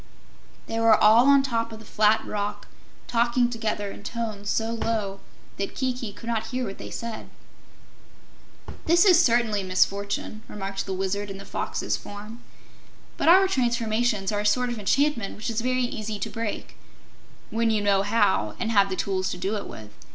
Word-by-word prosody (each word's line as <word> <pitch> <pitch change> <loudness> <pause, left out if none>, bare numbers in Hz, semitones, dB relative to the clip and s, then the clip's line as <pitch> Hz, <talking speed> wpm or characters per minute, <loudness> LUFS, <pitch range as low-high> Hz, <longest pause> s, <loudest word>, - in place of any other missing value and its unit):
They 225 - -3
were 225 -1 +6
all 225 +5 +6
on 280 -1 +6
top 230 -4 -1
of 220 - -8
the 220 - -13
flat 215 +1 +2
rock, 205 0 -4 0.4
talking 240 +1 +2
together 215 -3 -2
in - - -10
tones 215 -3 -4
so 225 0 0
low 220 -4 -2 0.4
that 195 - -4
Kiki 250 -4 -2
could 205 - -12
not 225 -1 -1
hear 255 0 -2
what 195 -2 -7
they - - -7
said. 230 -1 -6 1.6
"This 345 +4 +5
is 360 -3 +7
certainly 230 -5 +2
a - - -6
misfortune," 200 +3 0
remarked 195 -1 -5
the 190 - -2
Wizard 195 +2 -2
in 195 - -6
the 200 - -10
Fox's - - -2
form, 210 +4 -10 0.7
"but - - +2
our 380 +2 +7
transformations 235 - 0
are 205 - -1
a - - -2
sort 245 +4 +2
of 235 - -4
enchantment 240 +1 +1
which 220 +2 -4
is 225 0 -1
very 255 +1 +1
easy 215 -2 -4
to 200 - -4
break 225 -2 -5 0.7
when 230 0 +1
you 220 -1 +2
know 200 -1 +3
how 105 - +1
and 225 - -1
have 200 -2 +4
the 190 - -2
tools 185 -1 -1
to - - -4
do 195 +4 -2
it 205 - -5
with. 105 -1 -10
220 Hz, 180 wpm, -25 LUFS, 200-235 Hz, 1.6 s, is